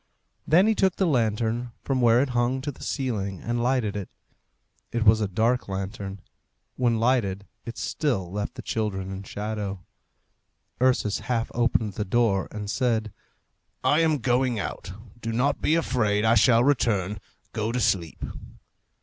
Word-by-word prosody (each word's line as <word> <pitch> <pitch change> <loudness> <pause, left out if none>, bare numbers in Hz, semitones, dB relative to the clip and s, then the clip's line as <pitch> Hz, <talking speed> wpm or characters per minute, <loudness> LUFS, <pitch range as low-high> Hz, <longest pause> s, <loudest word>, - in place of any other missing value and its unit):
Then 175 +5 +5
he 220 - +4
took 190 -4 +2
the 190 - +1
lantern 115 - 0
from 130 -2 0
where 120 +2 +5
it 140 - -3
hung 120 +1 +1
to 145 +2 -3
the - - -16
ceiling 105 - -2
and 120 0 -2
lighted 120 -4 +1
it. 100 -3 -5 0.8
It 120 -2 -1
was 110 +1 +6
a 105 - +1
dark 115 +6 +1
lantern. 95 0 -5 0.5
When 120 -3 +1
lighted 110 -5 +1 0.2
it 115 - -6
still 100 - -1
left 105 +1 -3
the - - -8
children 95 -4 -2
in 95 0 -5
shadow. 100 -2 -5 1.0
Ursus 125 -5 +2
half 115 -2 -2
opened 115 -3 +1
the 105 - -2
door, 105 -2 +1
and 105 -1 -6
said, 110 -3 0 0.7
"I 150 - +4
am 160 -2 +3
going 125 -1 +1
out; 95 - -5 0.3
do 115 0 -3
not 125 +5 +1
be 155 - +3
afraid. 105 -10 +1
I 110 - +5
shall 115 +1 +5
return. 105 -8 +1 0.3
Go 110 0 -1
to 125 - -1
sleep." 95 -7 0
115 Hz, 160 wpm, -26 LUFS, 100-125 Hz, 1.0 s, was